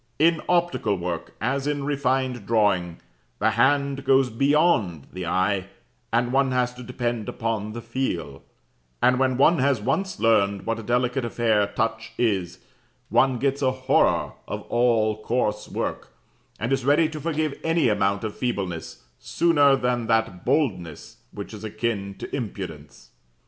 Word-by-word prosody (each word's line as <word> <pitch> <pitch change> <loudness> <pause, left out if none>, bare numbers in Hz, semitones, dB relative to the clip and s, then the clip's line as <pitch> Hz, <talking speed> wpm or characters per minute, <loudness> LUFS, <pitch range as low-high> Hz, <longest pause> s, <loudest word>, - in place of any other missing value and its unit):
In 165 +1 +3
optical 175 - +1
work, 85 -1 -5
as 135 +4 -1
in 145 -1 -1
refined 130 -5 -1
drawing, 100 -7 +1 0.4
the 110 +2 +2
hand 140 +4 +2
goes 135 -2 +3
beyond 125 - +2
the 90 -1 -5
eye, 95 +1 0 0.4
and 120 +2 +1
one 135 -1 +3
has 125 -1 +1
to 125 - -11
depend 120 -3 -3
upon 110 -2 -3
the 120 0 -7
feel; 115 - -3 0.6
and 125 +1 +3
when 130 -1 +2
one 155 +4 +4
has 135 -2 +2
once 135 - -1
learned 100 -3 +2
what 115 0 -1
a - - -5
delicate 125 +3 0
affair 110 -3 +1
touch 110 +1 -3
is, 95 -7 0 0.5
one 130 -2 +3
gets 140 +2 0
a 130 - +3
horror 130 0 +2 0.2
of - - -5
all 115 -3 +2
coarse 105 -3 -1
work, - - -3 0.5
and 120 +5 -1
is 135 -2 0
ready 145 +4 +4
to 155 -1 -7
forgive 155 -2 -2
any 165 -4 +2
amount 100 -1 +1
of 110 -1 -4
feebleness, 95 -9 -4 0.2
sooner 145 -5 +3
than 125 -3 -1
that 110 -5 0
boldness 90 - -1
which 100 +2 -8
is 105 0 -9
akin 110 -2 -3
to - - -6
impudence. 120 -8 -7
120 Hz, 150 wpm, -24 LUFS, 105-135 Hz, 0.6 s, one